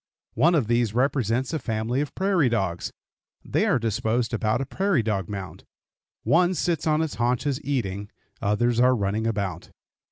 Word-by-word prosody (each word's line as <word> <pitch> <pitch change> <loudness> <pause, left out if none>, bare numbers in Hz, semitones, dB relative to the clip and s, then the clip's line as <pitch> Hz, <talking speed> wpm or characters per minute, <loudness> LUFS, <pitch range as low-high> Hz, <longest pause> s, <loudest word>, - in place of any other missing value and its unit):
One 170 +3 +4
of 145 -7 +2
these 120 -1 +1
represents 130 0 +1
a 160 - 0
family 115 +2 -1
of 145 - -5
prairie 185 -8 +2
dogs. 95 -7 -1 0.5
They - - +1
are - - +3
disposed 115 +1 -1
about 110 0 +1
a 135 - -2
prairie 190 - +1
dog 100 -5 -2
mound. 100 -3 -7 0.6
One 175 +3 +3
sits 170 0 -1
on 155 +1 +3
its 160 - -3
haunches 125 +4 0
eating; 105 -8 -2 0.3
others 115 +3 +1
are 125 +1 +5
running 105 +1 -1
about. 100 -5 -3
120 Hz, 160 wpm, -25 LUFS, 110-145 Hz, 0.6 s, are